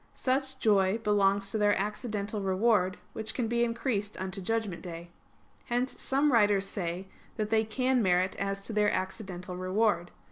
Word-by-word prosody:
Such 265 0 -1
joy 205 -4 +3
belongs 200 -2 +2
to 220 - -1
their 205 0 +3
accidental 210 0 -3
reward, 190 -1 +2 0.2
which 220 0 -4
can 240 -3 0
be 235 +1 +1
increased 230 -4 -1
unto 190 +1 -4
judgment 215 -2 -2
day. 170 -1 -8 0.5
Hence 245 +1 -2
some 280 +2 +2
writers 205 -3 +4
say 180 0 -4 0.3
that 215 0 -2
they 220 0 +4
can 255 +3 +1
merit 185 -1 +2
as 195 0 -3
to 225 - -5
their 210 -1 +3
accidental 185 -2 -4
reward. 185 -1 +1
205 Hz, 155 wpm, -30 LUFS, 190-225 Hz, 0.5 s, writers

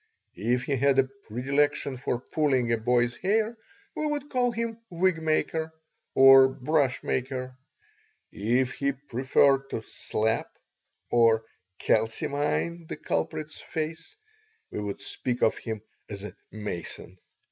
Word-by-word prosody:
If 125 +1 +2
he 140 - 0
had 140 +1 +3
a 135 - +6
predilection 135 +2 -1
for 125 -1 -2
pulling 130 -3 +1
a 115 - +3
boy's 120 +1 +2
hair 220 +4 +1 0.4
we 310 - -1
would 295 -1 -3
call 250 -2 +2
him 230 0 -3
"wig 175 -1 +1
maker" 160 0 0 0.4
or 135 0 +9
"brush 130 0 0
maker"; 130 0 -2 0.8
if 125 +5 +1
he 140 0 0
preferred 135 +1 +2
to 110 - -4
slap 110 +1 -2 0.5
or 115 -2 +4 0.3
"calcimine" 145 +8 0
the - - -5
culprit's 150 - -3
face 160 - -5 0.6
we - - -4
would 100 -1 -4
speak 125 -1 -3
of 110 - +3
him 110 -2 -5 0.3
as 100 -2 -7
a 105 - -7 0.2
mason. 95 -3 -6
135 Hz, 125 wpm, -27 LUFS, 120-155 Hz, 0.8 s, or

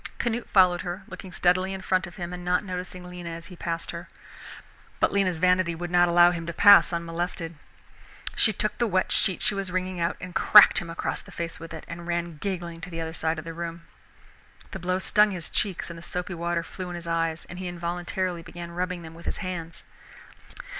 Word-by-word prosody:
Canute 240 0 -2
followed 180 -3 +5
her, 180 +3 -5
looking 190 - -9
steadily 185 +2 +2
in 190 - -7
front 185 -1 +1
of 175 - -12
him 175 -1 -5
and 180 0 -6
not 180 +2 +1
noticing 180 -1 -5
Lena 180 -1 -7
as 165 0 -7
he - - -10
passed 170 -1 -3
her. 170 +1 -7 0.9
But - - +3
Lena's 190 -4 +2
vanity 180 0 +3
would 175 +1 -5
not 175 0 +5
allow 175 0 +7
him 170 -1 -5
to 170 - -3
pass 205 +2 +8
unmolested. 170 0 -3 0.8
She 220 - +4
took 215 +1 -1
the 240 - +2
wet 185 -3 +1
sheet 190 - +2
she - - +2
was 195 -1 -3
wringing 185 0 -2
out 170 +1 0
and 180 -1 -8
cracked 210 +2 +8
him 170 - -7
across 165 - -3
the - - -16
face 170 0 -4
with 165 0 -9
it, 160 -1 -8
and 170 0 -8
ran 170 -2 -2
giggling 170 -2 -4
to 170 - -6
the 165 -1 -5
other 160 0 -4
side 160 0 -1
of 155 - -6
the 165 - -6
room. 170 0 -6 0.9
The 190 - -6
blow 185 +1 0
stung 210 +2 +4
his 180 -5 -4
cheeks 190 -3 0
and 170 - -8
the - - -11
soapy 180 +2 -4
water 170 0 -1
flew 185 +1 -7
in 175 - -5
his 170 -1 -7
eyes, 165 -1 -1
and 175 - -8
he 185 - -4
involuntarily 175 +1 -3
began 170 +1 -8
rubbing 180 0 -3
them 160 0 -10
with 170 +1 -12
his - - -1
hands. 170 -2 -6
175 Hz, 220 wpm, -26 LUFS, 170-185 Hz, 0.9 s, pass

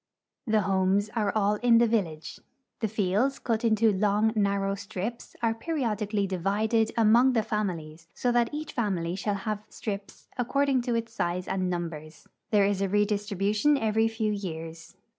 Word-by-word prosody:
The 215 -1 +3
homes 195 +2 +1
are 210 -3 +1
all 210 0 +2
in 235 +1 +4
the 235 - +5
village. 170 -9 -2 0.4
The 220 - 0
fields, 215 +6 0
cut 230 -1 -2
into 220 -1 +3
long, 210 +2 +2
narrow 200 -1 +1
strips, 205 +3 -6
are 225 -1 +3
periodically 220 - -1
divided 210 +5 0
among 235 +4 +5
the 225 -3 +2
families, 170 -7 -4
so 245 - 0
that 240 -1 +2
each 305 +1 -5
family 185 - -1
shall 205 +1 -1
have 210 +1 -3
strips 200 -2 -6
according 265 +1 +2
to 235 - +1
its 230 0 -3
size 180 +1 -2
and 185 -1 -1
numbers. 160 -3 -5 0.2
There 205 -2 +4
is 200 -1 0
a 195 - 0
redistribution 205 +5 +1
every 220 -1 +2
few 220 -1 -1
years. 165 -4 -6
210 Hz, 160 wpm, -27 LUFS, 195-225 Hz, 0.4 s, the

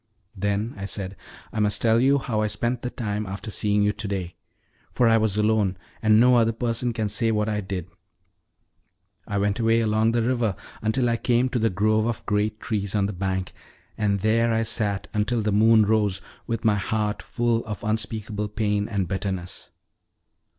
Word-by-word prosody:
"Then," 100 +4 -1
I 100 - -5
said, 100 -1 -4 0.4
"I 110 - -2
must 105 -1 +2
tell 115 0 +3
you 135 +3 +4
how 115 -5 -1
I 105 - +1
spent 120 +4 -1
the 125 - -3
time 105 -4 -3
after 100 +3 -6
seeing 105 0 +1
you 105 0 +2
to 105 - -4
day; 95 -3 -4 0.6
for 120 - +2
I 115 0 +5
was 110 -2 +1
alone, 105 -3 +2 0.2
and 110 -1 +5
no 125 +1 +6
other 115 -1 +3
person 120 +1 -1
can 110 -2 -2
say 115 +2 +1
what 105 0 0
I 105 -1 -1
did. 95 -3 -5 1.4
I 100 - -2
went 100 +2 0
away 115 0 +3
along 110 0 +2
the 120 -1 +1
river 120 -4 0 0.3
until 120 +3 +1
I 115 0 +1
came 120 +2 +1
to 125 - -1
the 115 0 +2
grove 110 +3 +1
of 120 - -3
great 105 +1 0
trees 100 -3 -2
on 100 -2 +2
the 100 - -3
bank, 95 0 -3 0.4
and 100 -2 0
there 115 +2 +2
I 115 0 +1
sat 105 -3 0
until 110 +2 0
the 105 - 0
moon 110 +1 +5
rose, 105 -3 +1 0.3
with 115 -1 -3
my 105 -2 +4
heart 105 +2 -1
full 120 -1 0
of 105 -2 -6
unspeakable 105 0 -2
pain 105 -1 -1
and 100 -4 -1
bitterness." 95 0 -4
110 Hz, 190 wpm, -24 LUFS, 100-115 Hz, 1.4 s, no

